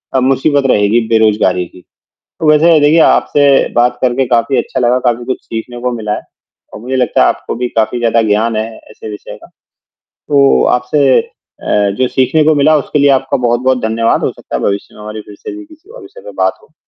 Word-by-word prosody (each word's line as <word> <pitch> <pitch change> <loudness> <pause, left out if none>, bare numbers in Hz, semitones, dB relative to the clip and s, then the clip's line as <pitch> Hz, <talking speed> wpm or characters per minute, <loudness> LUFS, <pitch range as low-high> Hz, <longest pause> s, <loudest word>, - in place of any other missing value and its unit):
अ, - - +4
मुसीबत 135 +2 +1
रहेगी 105 +3 +2
बेरोज़गारी 105 -5 +2
की। 90 +1 -17 0.6
वैसे 155 +2 +4
देखिए 150 +3 +3
आपसे 145 -2 +3 0.3
बात 120 0 +2
करके 130 +1 +1
काफ़ी 120 +2 +1
अच्छा - - -2
लगा, 125 0 +2
काफ़ी 120 -1 -1
कुछ 130 - -3
सीखने 120 +2 -7
को 125 0 -1
मिला 110 -3 -3
है - - -7 0.5
और - - -8
मुझे 125 +4 -4
लगता 125 -3 +1
है - - +4
आपको - - -3
भी 125 +1 -2
काफ़ी 110 +2 +1
ज़्यादा 115 -1 +1
ज्ञान 110 +2 0
है, 110 +1 -2 0.2
ऐसे 110 - -10
विषय 105 -1 -9
का, - - -14 0.6
तो 140 -2 +1
आपसे 130 +2 +2 0.4
अ, 105 -1 0
जो 130 - +2
सीखने 130 +5 +1
को 155 +1 +3
मिला 150 +2 +3
उसके 150 +1 -2
लिए 140 0 +4
आपका 135 0 0
बहुत-बहुत 125 +1 0
धन्यवाद, 115 +1 0
हो - - 0
सकता - - -9
है - - -2
भविष्य 100 0 -3
में 105 - -13
हमारी 105 +1 -7
फ़िर 105 0 -14
से - - -8
भी 320 - -10
किसी 315 +5 -20
और - - -12
विषय 395 +5 -14
में - - -10
बात - - -1
हो। 450 - -25
125 Hz, 210 wpm, -13 LUFS, 110-140 Hz, 0.6 s, अ